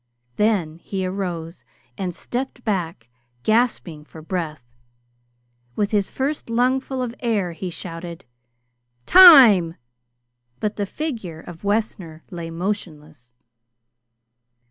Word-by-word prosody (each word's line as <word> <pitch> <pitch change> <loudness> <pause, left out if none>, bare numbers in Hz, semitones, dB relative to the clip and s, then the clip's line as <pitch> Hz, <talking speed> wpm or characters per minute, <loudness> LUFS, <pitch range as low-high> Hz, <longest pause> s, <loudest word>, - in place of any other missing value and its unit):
Then 190 -7 +1
he 190 +1 -4
arose 180 -3 -5 0.3
and 180 -3 -4
stepped 245 0 -5
back, 170 - -3 0.4
gasping 215 -9 0
for 155 +1 -13
breath. 160 -5 -4 1.1
With 205 -1 -1
his 205 -3 +1
first 275 -1 -3
lungful 255 +2 0
of 235 -2 -4
air 210 -7 -1
he 180 +2 -6
shouted: 170 -1 -8 0.8
"Time!" 240 - +8 0.8
But 210 -1 -2
the 205 -1 -2
figure 220 - -5
of 170 +1 -12
Wessner 200 -6 -2
lay 170 -2 -6
motionless. 155 - -5
190 Hz, 100 wpm, -22 LUFS, 165-225 Hz, 1.1 s, Time